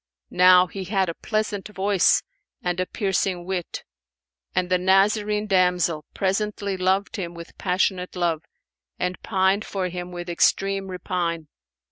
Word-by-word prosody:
Now 180 0 +7
he 190 +2 -7
had 190 -1 +1
a - - -2
pleasant 215 +1 -2
voice 200 -2 +2 0.4
and 180 0 -1
a 185 - 0
piercing 190 -3 -1
wit; 185 -2 -4 0.7
and 180 0 +1
the 180 0 +2
Nazarene 210 +3 +2
damsel 180 -5 +2
presently 200 0 -1
loved 190 +2 0
him 175 -3 -5
with 170 0 -10
passionate 180 0 0
love 170 -3 0 0.6
and 180 0 -3
pined 190 +2 +1
for 190 -4 -3
him 180 0 -6
with 175 0 -6
extreme 195 +3 +1
repine. 175 -4 -3
185 Hz, 135 wpm, -24 LUFS, 180-195 Hz, 0.7 s, Now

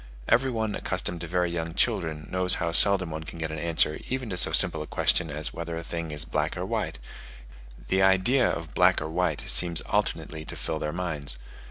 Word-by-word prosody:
Every 130 +3 +2
one 110 -3 -2
accustomed 90 -3 -3
to 85 - -6
very 90 0 -1
young 80 -1 -4
children, 80 -2 -1
knows 90 0 +4
how 85 - -2
seldom 95 0 +7
one 80 0 -6
can 80 - -10
get 80 -1 -4
an 80 - -5
answer 80 -1 0
even 130 -4 -3
to - - -3
so 90 - +3
simple - - +5
a - - -7
question 80 - +1
as 75 +1 -1
whether 85 0 -6
a 85 - -6
thing 85 -1 -5
is 75 -2 -5
black - - -2
or - - -3
white; - - -3 0.9
the 95 +1 +2
idea 95 +7 +3
of 80 -1 -5
black 90 0 +3
or 75 - -5
white 85 -3 -1
seems 85 -2 0
alternately 80 -1 -3
to - - -8
fill 80 -1 -4
their 75 - -3
minds. 75 -7 -1
85 Hz, 210 wpm, -26 LUFS, 80-90 Hz, 0.9 s, seldom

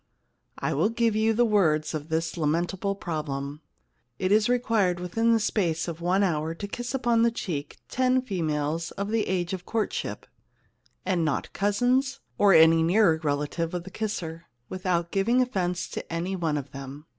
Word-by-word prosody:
I - - -1
will 170 +9 +2
give 230 -1 +1
you 220 +1 +3
the 240 +2 +3
words 170 -9 +2
of 155 0 -5
this 160 +1 -1
lamentable 175 +5 -1
problem: 150 -5 -4 0.6
It 185 +6 -1
is 215 +3 +4
required 225 -7 +2
within 225 +6 +1
the 225 - +4
space 175 -7 0
of 170 -1 -5
one 185 +3 +2
hour 160 -3 0
to 200 - -6
kiss 240 +4 -4
upon 240 -3 +2
the 235 - +5
cheek 155 -10 -5
ten 255 0 +1
females 165 - -2
of 200 +1 -4
the 225 -1 +1
age 180 -1 -1
of 180 -1 -6
courtship 225 -2 -2 0.8
and 185 -3 +1
not 150 -3 -2
cousins 245 +7 +1 0.2
or 205 -1 +6
any 165 -1 +7
nearer 170 -1 +4
relative 150 +3 -1
of 175 - -3
the 190 - -10
kisser, 170 -7 -4 0.2
without 180 -2 -1
giving 230 +6 +2
offence 180 -8 0
to - - -7
any 175 +3 -2
one 165 -4 -1
of 140 -1 -6
them." 135 +2 -9
180 Hz, 170 wpm, -26 LUFS, 160-215 Hz, 0.8 s, any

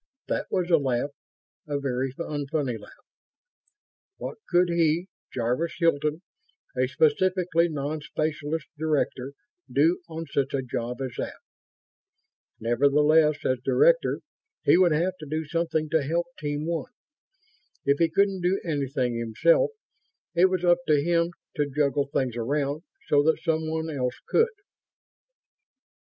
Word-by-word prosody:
That - - -1
was 180 -2 -1
a 165 - +7
laugh. 135 0 -1 0.6
A 145 -1 -1
very 135 -1 -1
unfunny 145 -3 -2
laugh. 105 - -16 1.1
What - - -6
could 180 0 +4
he, 170 0 +2 0.3
Jarvis 125 +7 -1
Hilton, 155 -1 +1 0.5
a 130 0 +2
specifically 170 +4 +2
non 150 0 -3
specialist 155 +1 -2
director, 145 -4 -1 0.4
do 165 +6 +3
on 165 0 -5
such 140 -2 -1
a 135 - -1
job 125 +1 -4
as 130 - -3
that? - - -3 1.2
Nevertheless, 150 +5 +3
as 130 -1 +1
director, - - +3 0.4
he - - +5
would 180 -1 +5
have 170 +5 +1
to 155 - -8
do 155 +2 -2
something 160 0 -1
to 160 -1 +3
help 165 +5 0
Team 145 0 -2
One. 170 +7 -3 0.9
If 140 0 +3
he 165 -1 +4
couldn't 195 +2 +2
do 180 +2 +1
anything 135 -5 -1
himself, 280 - +3 0.6
it 175 +1 +5
was 185 -1 +1
up 175 0 +5
to 150 -2 +4
him 170 +2 +1 0.3
to 145 -1 +1
juggle 140 0 +1
things 130 -4 -1
around 140 +5 -1 0.3
so 145 - +4
that 160 +2 +1
someone 160 0 -1
else 125 -4 -2
could. 455 +1 +3
155 Hz, 135 wpm, -26 LUFS, 140-170 Hz, 1.2 s, a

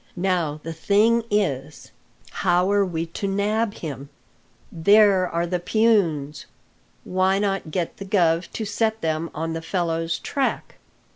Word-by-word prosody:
Now 175 -5 -1
the 165 - -5
thing 215 +7 +2
is 150 -9 -2 0.4
how 180 +1 +1
are 205 0 +3
we 170 -3 -2
to 170 +4 -5
nab 205 +2 0
him?" 140 -3 -7 0.6
"There 195 +1 +4
are 170 +1 -1
the 180 +1 -2
peons. 175 -8 +1 0.3
* - - -38
Why 185 +1 +1
not 195 -4 -1
get 170 +1 -3
the 195 - -7
guv 175 -4 +1
to 220 - -3
set 220 +2 -1
them 160 +1 -1
on 165 +1 -3
the 165 - -4
fellow's 165 -1 -1
track?" 275 - -3
180 Hz, 145 wpm, -23 LUFS, 165-205 Hz, 0.6 s, There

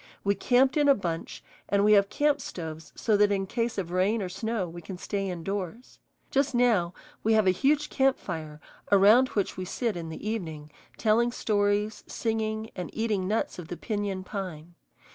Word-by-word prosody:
We 200 - +3
camped 260 - +3
in 290 -1 +4
a 280 - +7
bunch, 170 -7 -4 0.3
and 200 0 +3
we 210 - +5
have 200 -1 +5
camp 290 -1 +1
stoves 160 -7 -7
so 220 - +1
that 205 0 +4
in 195 -1 0
case 230 +3 -2
of 180 -3 -3
rain 195 +4 +1
or 185 - -4
snow 220 0 -2
we 170 +1 -9
can 185 +2 -8
stay 195 +1 -3
indoors. 195 +6 -5 0.3
Just 275 -1 +1
now 215 -8 +3 0.3
we 225 - +2
have 215 -2 +4
a 185 - +5
huge 285 +10 +1
camp 270 -1 +3
fire 155 -4 -6 0.3
around 210 +6 +7
which 200 -3 -2
we 185 - -3
sit 225 +3 -2
in 165 -2 -5
the 160 +6 -7
evening, 160 -9 -4 0.3
telling 235 +2 +3
stories, 205 -1 0
singing, 220 -1 -2
and 180 -3 -5
eating 215 -4 -1
nuts 215 -2 -1
of 170 - -8
the 175 - -6
piñon 205 -3 -3
pine. 175 -5 -6
205 Hz, 185 wpm, -28 LUFS, 180-225 Hz, 0.3 s, a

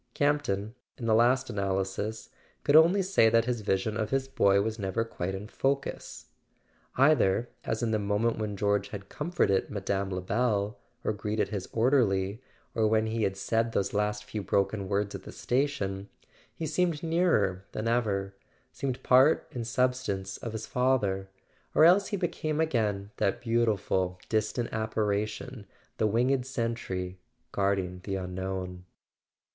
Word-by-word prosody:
Campton, 120 -8 0 0.2
in 120 - -6
the 110 - +3
last 120 +4 +4
analysis, 100 +2 -2 0.3
could 145 - +3
only 170 +5 +6
say 185 -12 +4
that 115 0 +3
his 120 -2 -1
vision 100 +1 0
of 110 0 -1
his 135 0 0
boy 100 -7 +3
was 110 +2 -2
never 100 +3 -1
quite 95 -4 -4
in 100 +2 -6
focus. 135 +4 -2 0.7
Either— 125 -5 +3 0.2
as 110 - -1
in 115 - +1
the 110 - +1
moment 105 +3 0
when 105 -2 -3
George 100 +1 +1
had 100 -2 -8
comforted 150 - 0
Mme. 100 -1 -2
Lebel, 100 +3 -1 0.2
or - - 0
greeted 105 +1 -1
his 100 -4 -4
orderly, 110 -4 +2 0.3
or 110 -1 +2
when 110 0 +2
he 110 +1 -2
had 95 -2 0
said 115 +3 0
those 100 0 0
last 105 0 0
few 105 0 -5
broken 100 +1 0
words 100 0 0
at - - -6
the - - -10
station—he 120 +1 -3
seemed 160 0 0
nearer 160 - +1
than 110 +1 -3
ever, 100 -5 0 0.4
seemed 130 -2 -4
part 130 +5 +5
and 115 -2 -4
substance 120 -7 -1
of 115 -3 -6
his 110 -1 -4
father; 105 -7 +1 0.5
or 155 - +7
else 185 +4 +6
he 205 - -2
became 160 -4 -2
again 105 -10 0
that 100 +4 +1
beautiful 110 -6 0
distant 110 +2 -1
apparition, 110 +1 -2 0.3
the 110 - +3
winged 125 +4 +1
sentry 115 -8 -3 0.3
guarding 95 -2 0
the 100 - -3
Unknown. 90 -1 -4
110 Hz, 150 wpm, -29 LUFS, 100-125 Hz, 0.7 s, or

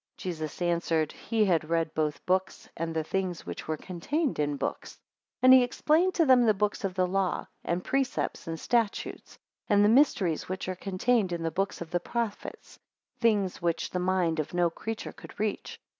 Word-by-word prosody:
6 - - -11
Jesus 165 -1 -4
answered, 170 -2 +1
he 225 -2 0
had 165 -5 +1
read 165 -1 0
both 150 -2 -2
books, 185 +1 -1
and 165 0 -3
the 160 - 0
things 185 +1 -3
which - - -7
were 155 0 -1
contained 260 - -2
in 145 -1 0
books. - - -4
7 - - -25 0.4
And 255 0 +9
he 260 - +9
explained 315 +8 +2
to 330 - +4
them 255 -3 +6
the 215 -3 +4
books 210 +2 -1
of 190 -2 -2
the 185 -1 +2
law, 185 0 -1 0.2
and 175 +1 -1
precepts, 270 - -1
and 165 -1 -4
statutes: 230 -4 -1 0.3
and 205 -1 +4
the - - +5
mysteries 215 - +3
which 185 0 -4
are 185 - -1
contained 195 +2 0
in 170 -1 -3
the 165 - -1
books 195 +3 -2
of 170 -1 -7
the 175 - +1
prophets; 230 +2 -5 0.4
things 210 -5 +1
which 170 -1 -1
the 180 - -1
mind 180 -3 +1
of 155 +3 -3
no 175 -1 +2
creature 220 +6 -5
could - - -13
reach. 215 -1 -3
185 Hz, 195 wpm, -28 LUFS, 165-220 Hz, 0.4 s, And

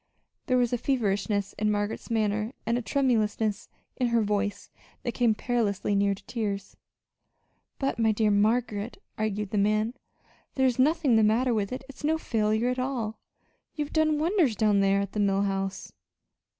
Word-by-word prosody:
There 255 -2 +3
was 245 -1 +1
a 245 - 0
feverishness 205 -5 0
in 215 0 +1
Margaret's 205 +2 -2
manner 215 0 0
and 230 +1 +1
a 245 - 0
tremulousness 225 -5 0 0.3
in 250 - +1
her 235 -1 +2
voice 205 -1 -2 0.3
that 240 - -1
came 235 -3 +2
perilously 210 -4 -1
near 200 0 +2
to 195 - -18
tears. 200 -4 -4 1.0
"But, 270 -3 -2
my 220 -1 +4
dear 215 0 +2
Margaret," 215 +1 +1 0.2
argued 210 -2 -2
the 210 - +1
man, 215 +3 +1 0.6
"there's 260 -2 +2
nothing 290 -3 +3
the 220 - +4
matter 235 +4 +3
with 205 -3 -1
it. 255 +1 -5
It's 275 +1 -12
no 315 +2 +2
failure 220 -3 0
at 250 0 -1
all. 250 -4 -3 0.6
You've 295 -1 -4
done 310 -1 +3
wonders 320 - +2
down 210 -1 +3
there 195 0 +3
at 200 -1 -4
the 210 - -3
Mill 200 -1 +2
House." 195 -1 -3
220 Hz, 165 wpm, -27 LUFS, 205-250 Hz, 1.0 s, my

